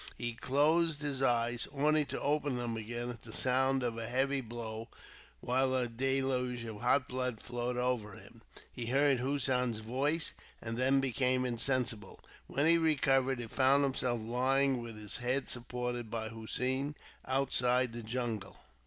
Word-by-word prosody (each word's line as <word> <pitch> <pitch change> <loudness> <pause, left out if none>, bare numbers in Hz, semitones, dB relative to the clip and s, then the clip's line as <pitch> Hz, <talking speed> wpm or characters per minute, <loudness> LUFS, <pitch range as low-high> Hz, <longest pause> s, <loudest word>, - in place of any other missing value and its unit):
He 120 -1 -3
closed 150 +5 +2
his 140 -3 -2
eyes, 120 -2 +2
only 150 +2 +2
to - - -4
open 145 -2 0
them 120 -2 -2
again 120 +2 -4
at 120 -2 -10
the 115 - -11
sound 130 +2 +1
of 115 -1 -2
a 115 - -4
heavy 135 +3 +1
blow, 115 -1 -6 0.5
while 130 +1 +1
a 125 -1 +1
deluge 125 0 0
of 110 -2 -7
hot 130 +2 +3
blood 125 -3 -2
flowed 120 0 -3
over 125 -5 -1
him. - - -14 0.3
He 120 -2 -5
heard 135 +1 +3
Hossein's 125 -3 +1
voice, 140 +8 0 0.3
and 115 0 -4
then 135 +2 +3
became 130 -1 +1
insensible. 120 -3 -1 0.3
When 140 - 0
he 165 +1 +6
recovered, 135 -4 +2
he 120 - -4
found 135 +4 +3
himself 130 -3 0
lying 130 +3 +1
with 115 -2 -8
his 105 -1 -5
head 125 +3 0
supported 120 -1 -4
by 110 0 -3
Hossein, 130 +5 -2 0.3
outside 130 -2 +2
the 120 - -5
jungle. 115 -3 -3
125 Hz, 155 wpm, -33 LUFS, 120-135 Hz, 0.5 s, he